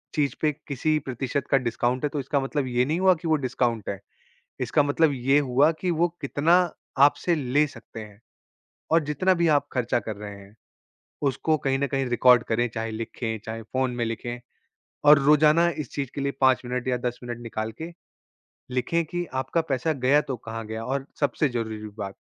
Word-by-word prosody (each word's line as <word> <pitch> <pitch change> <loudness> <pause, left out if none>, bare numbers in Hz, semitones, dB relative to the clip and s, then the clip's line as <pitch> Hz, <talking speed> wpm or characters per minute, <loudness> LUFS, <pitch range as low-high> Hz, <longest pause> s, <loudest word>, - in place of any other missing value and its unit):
चीज़ 145 -2 +1
पे 155 - +3 0.2
किसी 155 +3 0
प्रतिशत 135 +1 -3
का 135 - +6
डिस्काउंट 125 +1 -1
है, 150 - +1
तो 145 - -3
इसका 140 +2 0
मतलब 135 0 -2
ये 125 0 +1
नहीं 160 +5 -1
हुआ 190 0 +5
कि 165 +1 -7
वो 160 - +4
डिस्काउंट 120 -4 -1
है। 100 - -4 0.6
इसका 150 - +2
मतलब 145 +2 +2
ये 135 +2 +2
हुआ 140 +3 +3
कि 185 - 0
वो 170 +1 +2
कितना 145 +4 +1 0.5
आपसे 170 +4 +2
ले 145 +1 +2
सकते 115 -4 -11
हैं। 105 -1 -14 0.7
और 165 - +6
जितना 150 +6 +2
भी 170 -1 +2
आप 145 - +1
खर्चा 120 -1 0
कर 110 -1 -6
रहे 105 -1 -8
हैं, 100 +1 -15 0.7
उसको 150 +3 +1
कहीं 135 0 +2
न 140 - 0
कहीं 135 +1 -1
रिकॉर्ड 125 0 +5
करें, 120 +2 +1
चाहे 115 0 -4
लिखें, 115 0 -4
चाहे 115 0 -5
फ़ोन 130 +3 -1
में 120 - -1
लिखें 120 +1 -4 0.7
और 150 -1 +8
रोज़ाना 150 +4 +5 0.2
इस 120 - -15
चीज 140 -3 -3
के 140 - -3
लिए 140 - 0
5 130 -1 +4
मिनट 125 +1 -3
या 125 -1 +1
10 120 0 -3
मिनट 120 -1 -5
निकाल 110 -1 -4
के 165 +2 -5 0.8
लिखें 165 +7 0
कि 175 +3 -3 0.2
आपका 130 +6 0
पैसा 135 +5 +1
गया, 135 +2 +3
तो 130 -4 -5
कहाँ 115 0 -7
गया 110 +1 -5
और 135 +2 -2
सबसे 145 +1 +1
ज़रूरी 115 -2 -3 0.2
बात, 100 -1 -5
130 Hz, 195 wpm, -25 LUFS, 120-150 Hz, 0.8 s, और